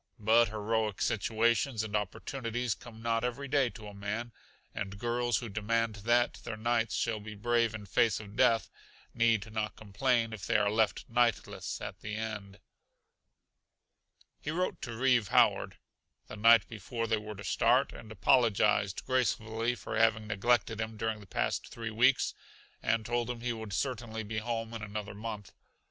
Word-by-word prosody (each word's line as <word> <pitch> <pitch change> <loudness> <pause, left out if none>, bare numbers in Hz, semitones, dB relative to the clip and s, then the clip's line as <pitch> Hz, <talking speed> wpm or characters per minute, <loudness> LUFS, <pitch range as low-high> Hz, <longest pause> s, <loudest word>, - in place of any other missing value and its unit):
But 115 +2 +4
heroic 110 -1 -1
situations 115 +2 +1
and 110 -1 -4
opportunities 115 +3 -2
come 115 0 -12
not 115 0 +1
every 125 +3 -2
day 135 -2 +2
to 110 -2 -11
a 105 - -9
man, 105 +4 -4 0.4
and 100 -1 -5
girls 120 +1 0
who 120 - -4
demand 110 +1 -1
that 120 +4 +2
their 110 - -5
knights 115 0 0
shall 115 -2 0
be 105 0 -8
brave 115 +1 +1
in 105 -2 -7
face 110 +2 +2
of 105 -1 -10
death 115 -1 +3 0.4
need 115 -2 +2
not 110 -1 -2
complain 115 +2 0
if 100 -4 -7
they - - +3
are 105 0 +2
left 110 -1 +1
knightless 120 -1 0
at - - -6
the 105 0 -5
last. 105 -3 -5 1.8
He - - -5
wrote 180 +4 -1
to 120 -2 -5
Reeve 120 -4 +3
Howard, - - +3 0.5
the - - -9
night 115 0 +6
before 115 +2 -4
they 110 -1 +1
were 105 0 -7
to 100 - -9
start, 90 - +3
and 110 -2 -11
apologized 105 -3 +3
gracefully 115 -2 0
for - - -5
having 110 -1 +3
neglected 115 +1 +1
him 110 0 -4
during 110 0 -2
the 100 - -13
past - - -1
three 115 -2 -6
weeks 125 +4 +3 0.5
and 115 -1 +1
told 120 0 -1
him 120 -1 -4
he 120 0 -1
would 110 -2 -7
certainly 115 -1 -2
be 110 +1 -3
home 115 0 -3
in 115 - -5
another 105 0 -5
month. 105 -1 -6
110 Hz, 165 wpm, -31 LUFS, 105-120 Hz, 1.8 s, night